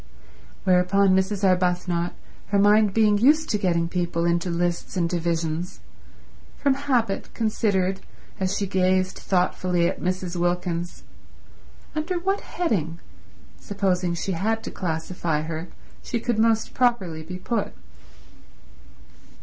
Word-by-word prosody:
Whereupon 190 Hz, +2 st, +4 dB
Mrs. 190 Hz, +1 st, 0 dB
Arbuthnot, 180 Hz, -2 st, +1 dB, 0.3 s
her 200 Hz, -, +1 dB
mind 205 Hz, +1 st, +5 dB
being 210 Hz, 0 st, +3 dB
used 310 Hz, +7 st, +4 dB
to 210 Hz, -, +1 dB
getting 170 Hz, -4 st, +1 dB
people 170 Hz, -1 st, -1 dB
into 170 Hz, +1 st, +1 dB
lists 175 Hz, +2 st, -2 dB
and 170 Hz, -2 st, +2 dB
divisions, 170 Hz, 0 st, -2 dB, 0.8 s
from 280 Hz, -1 st, +2 dB
habit 255 Hz, -7 st, -1 dB
considered, 200 Hz, -4 st, 0 dB, 0.4 s
as 190 Hz, +1 st, 0 dB
she 200 Hz, -, -1 dB
gazed 185 Hz, -1 st, +1 dB
thoughtfully 180 Hz, -1 st, +1 dB
at -, -, -3 dB
Mrs. 185 Hz, 0 st, -2 dB
Wilkins, 175 Hz, 0 st, -2 dB, 0.9 s
under 315 Hz, +4 st, -2 dB
what 390 Hz, +3 st, -1 dB
heading, 170 Hz, -, -2 dB, 0.6 s
supposing 185 Hz, -3 st, 0 dB
she 180 Hz, +3 st, -3 dB
had 220 Hz, +6 st, -1 dB
to -, -, -5 dB
classify 160 Hz, -2 st, -2 dB
her, 160 Hz, +2 st, -5 dB, 0.3 s
she 235 Hz, -, -3 dB
could 235 Hz, -1 st, -1 dB
most 225 Hz, 0 st, +2 dB
properly 200 Hz, -11 st, +1 dB
be 180 Hz, +3 st, -7 dB
put. 205 Hz, +3 st, -2 dB
185 Hz, 120 wpm, -24 LUFS, 175-210 Hz, 0.9 s, mind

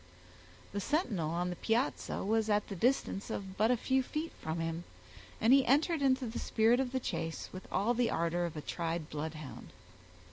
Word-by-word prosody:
The 200 Hz, -, -2 dB
sentinel 205 Hz, -, 0 dB
on 175 Hz, +2 st, -1 dB
the -, -, -4 dB
piazza 230 Hz, +3 st, 0 dB
was 220 Hz, +1 st, +2 dB
at 210 Hz, 0 st, +2 dB
the 200 Hz, -, -4 dB
distance 230 Hz, -1 st, +1 dB
of 195 Hz, -3 st, -5 dB
but 215 Hz, +3 st, +3 dB
a 250 Hz, -, +4 dB
few 265 Hz, +3 st, +2 dB
feet 305 Hz, +5 st, -3 dB
from 160 Hz, +1 st, -2 dB
him, 165 Hz, +1 st, -2 dB, 0.6 s
and 230 Hz, +4 st, +5 dB
he 275 Hz, 0 st, +7 dB
entered 300 Hz, +5 st, +3 dB
into 260 Hz, -1 st, +3 dB
the 230 Hz, 0 st, -4 dB
spirit 230 Hz, +2 st, +3 dB
of 260 Hz, -2 st, 0 dB
the 260 Hz, -, 0 dB
chase 165 Hz, -7 st, -3 dB
with 185 Hz, -, -8 dB
all 220 Hz, +5 st, +2 dB
the 245 Hz, -1 st, +2 dB
ardor 170 Hz, +1 st, 0 dB
of 160 Hz, -, -8 dB
a -, -, -3 dB
tried 165 Hz, 0 st, -3 dB
bloodhound. 155 Hz, -1 st, -6 dB
210 Hz, 190 wpm, -33 LUFS, 170-250 Hz, 0.6 s, he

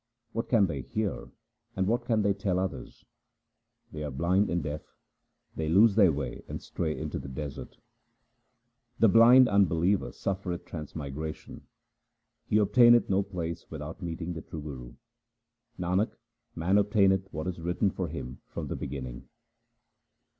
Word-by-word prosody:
What 115 Hz, -, -3 dB
can 110 Hz, -5 st, +5 dB
they 75 Hz, -7 st, -3 dB
hear 105 Hz, -, -3 dB, 0.5 s
and 95 Hz, -, +1 dB
what 120 Hz, +4 st, 0 dB
can 115 Hz, -4 st, +2 dB
they 100 Hz, 0 st, +3 dB
tell 95 Hz, -2 st, -1 dB
others? 95 Hz, 0 st, -4 dB, 0.9 s
They 75 Hz, 0 st, -6 dB
are 75 Hz, -, -3 dB
blind 85 Hz, +9 st, +1 dB
and 85 Hz, -2 st, -1 dB
deaf; 75 Hz, 0 st, -4 dB, 0.7 s
they 80 Hz, -1 st, -2 dB
lose 100 Hz, +6 st, +6 dB
their 100 Hz, -4 st, +5 dB
way 70 Hz, -1 st, -4 dB
and -, -, -5 dB
stray 80 Hz, -2 st, -3 dB
into -, -, -4 dB
the -, -, -8 dB
desert. 70 Hz, +1 st, -7 dB, 1.2 s
The 115 Hz, -, +5 dB
blind 120 Hz, +5 st, +7 dB
unbeliever 95 Hz, -1 st, +2 dB
suffereth 95 Hz, -3 st, -4 dB
transmigration. 75 Hz, -1 st, -7 dB, 0.8 s
He 105 Hz, -, +2 dB
obtaineth 120 Hz, +2 st, +5 dB
no 95 Hz, +1 st, +3 dB
place 85 Hz, -4 st, -5 dB
without 80 Hz, +4 st, -7 dB
meeting 85 Hz, 0 st, -4 dB
the 80 Hz, -, -6 dB
true 80 Hz, -2 st, -8 dB
Guru. 65 Hz, -5 st, -8 dB, 0.8 s
Nanak, 90 Hz, +5 st, 0 dB, 0.4 s
man 90 Hz, +5 st, +2 dB
obtaineth 100 Hz, -2 st, +2 dB
what 80 Hz, +1 st, -4 dB
is 90 Hz, -2 st, -4 dB
written 90 Hz, +3 st, 0 dB
for 90 Hz, -1 st, -3 dB
him 65 Hz, -5 st, -7 dB
from -, -, -6 dB
the -, -, -2 dB
beginning. 65 Hz, -3 st, -6 dB
90 Hz, 145 wpm, -29 LUFS, 80-100 Hz, 1.2 s, blind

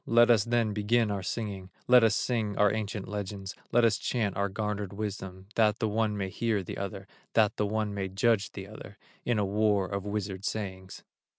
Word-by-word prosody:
Let 120 Hz, +1 st, +6 dB
us 110 Hz, -4 st, +4 dB
then 115 Hz, -2 st, +1 dB
begin 105 Hz, +1 st, +2 dB
our 100 Hz, -1 st, -2 dB
singing, 100 Hz, -2 st, -4 dB, 0.2 s
Let 125 Hz, -1 st, +7 dB
us 110 Hz, -1 st, +4 dB
sing 110 Hz, -6 st, -1 dB
our 105 Hz, -1 st, +4 dB
ancient 105 Hz, -2 st, -3 dB
legends, 100 Hz, -1 st, -5 dB, 0.2 s
Let 120 Hz, 0 st, +5 dB
us 115 Hz, 0 st, +2 dB
chant 110 Hz, -5 st, -1 dB
our 100 Hz, 0 st, 0 dB
garnered 105 Hz, -1 st, -3 dB
wisdom, 95 Hz, -2 st, -5 dB
That 110 Hz, -1 st, +3 dB
the 110 Hz, -, 0 dB
one 105 Hz, 0 st, 0 dB
may 95 Hz, -1 st, -2 dB
hear 110 Hz, 0 st, 0 dB
the -, -, -6 dB
other, 100 Hz, 0 st, -5 dB, 0.3 s
That 110 Hz, -2 st, +3 dB
the 105 Hz, -, +1 dB
one 105 Hz, 0 st, -1 dB
may 100 Hz, -1 st, -2 dB
judge 100 Hz, +2 st, +1 dB
the 95 Hz, -, -6 dB
other, 105 Hz, -2 st, -11 dB, 0.3 s
In 120 Hz, -2 st, +1 dB
a 105 Hz, -, +2 dB
war 105 Hz, 0 st, +2 dB
of 100 Hz, 0 st, -3 dB
wizard 100 Hz, -2 st, -3 dB
sayings." 95 Hz, -3 st, -5 dB
105 Hz, 200 wpm, -29 LUFS, 100-110 Hz, 0.3 s, Let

